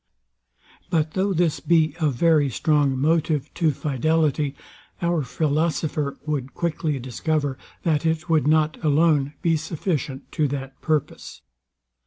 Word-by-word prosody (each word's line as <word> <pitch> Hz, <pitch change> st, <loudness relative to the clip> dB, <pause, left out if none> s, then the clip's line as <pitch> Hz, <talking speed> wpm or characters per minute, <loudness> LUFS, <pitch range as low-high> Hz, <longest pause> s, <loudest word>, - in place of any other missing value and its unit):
But 155 Hz, -2 st, +1 dB
though 195 Hz, +4 st, 0 dB
this 170 Hz, -3 st, +1 dB
be 160 Hz, -3 st, +2 dB
a 155 Hz, -2 st, +2 dB
very 150 Hz, +1 st, +3 dB
strong 145 Hz, +1 st, +1 dB
motive 155 Hz, 0 st, +1 dB
to 165 Hz, -3 st, +2 dB
fidelity, 150 Hz, 0 st, 0 dB, 0.4 s
our 170 Hz, -2 st, +1 dB
philosopher 150 Hz, +1 st, -1 dB
would 140 Hz, -4 st, -3 dB
quickly 160 Hz, -3 st, -1 dB
discover, 140 Hz, +3 st, -2 dB, 0.3 s
that 155 Hz, -3 st, +1 dB
it 160 Hz, 0 st, 0 dB
would 160 Hz, -4 st, +2 dB
not 155 Hz, +1 st, +2 dB
alone 150 Hz, -2 st, +3 dB
be 165 Hz, -1 st, +3 dB
sufficient 155 Hz, -3 st, -3 dB
to 155 Hz, -3 st, +1 dB
that 135 Hz, -1 st, -6 dB
purpose. 155 Hz, -3 st, -2 dB
155 Hz, 125 wpm, -23 LUFS, 145-160 Hz, 0.4 s, very